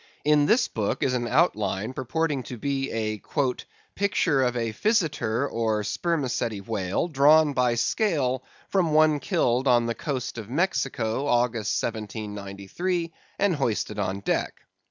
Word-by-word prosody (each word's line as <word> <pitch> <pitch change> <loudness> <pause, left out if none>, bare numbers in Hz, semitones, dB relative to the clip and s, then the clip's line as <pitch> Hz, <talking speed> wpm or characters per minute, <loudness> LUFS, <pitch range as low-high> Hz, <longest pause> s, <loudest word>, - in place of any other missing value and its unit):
In 150 -1 +4
this 235 +2 +4
book 105 -3 -2
is 130 - +1
an 120 -1 -1
outline 110 - +1
purporting 140 +2 -1
to 125 - -7
be 135 +2 -2
a 110 -2 -2 0.7
"Picture 185 -8 +1
of 125 -1 +1
a 115 -2 -2
Physeter 140 - +1
or 110 -4 -1
Spermaceti 125 - -1
whale, 100 - -2
drawn 150 0 +5
by 125 -2 +2
scale 130 - 0 0.2
from 175 -5 +1
one 155 -1 +4
killed 125 0 +1
on 120 -2 +4
the 115 - -1
coast 130 -2 -4
of 110 -1 -8
Mexico, 135 -5 -1
August, 120 -4 +1
1793, 105 - -4 0.2
and 200 -2 +2
hoisted 110 -6 -1
on 100 0 -2
deck." - - -2
125 Hz, 135 wpm, -26 LUFS, 110-150 Hz, 0.7 s, drawn